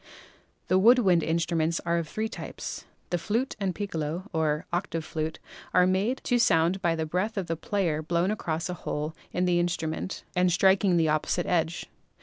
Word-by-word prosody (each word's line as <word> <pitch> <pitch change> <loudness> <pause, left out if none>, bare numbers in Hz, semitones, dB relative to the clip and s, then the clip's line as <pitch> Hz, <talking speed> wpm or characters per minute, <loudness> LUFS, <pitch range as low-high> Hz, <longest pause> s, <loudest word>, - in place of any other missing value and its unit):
The 185 - +4
wood 235 +6 +7
wind 185 -8 +4
instruments 165 0 0
are 170 0 +2
of 165 - -4
three 220 +1 -2
types. - - -7 0.3
The 175 - +1
flute 230 +9 -1
and 190 -3 -1
piccolo 175 -1 -4
(or 155 -1 0
octave 170 -3 -2
flute) 155 0 -3 0.4
are 180 - +6
made 195 +8 +1
to 245 -1 +2
sound 175 -3 +3
by 170 -3 +2
the 160 -1 -2
breath 185 +7 -2
of 190 - -1
the 165 - -2
player 170 -3 -1
blown 170 +4 0
across 165 -6 -2
a 180 - -3
hole 155 -2 -4 0.2
in 180 +1 0
the 175 -1 +3
instru 175 -2 -1
ment 160 +4 -4
and 180 0 +3
striking 190 +1 +4
the 160 -2 +3
opposite 155 +3 0
edge. 170 -1 0
175 Hz, 185 wpm, -27 LUFS, 160-190 Hz, 0.4 s, wood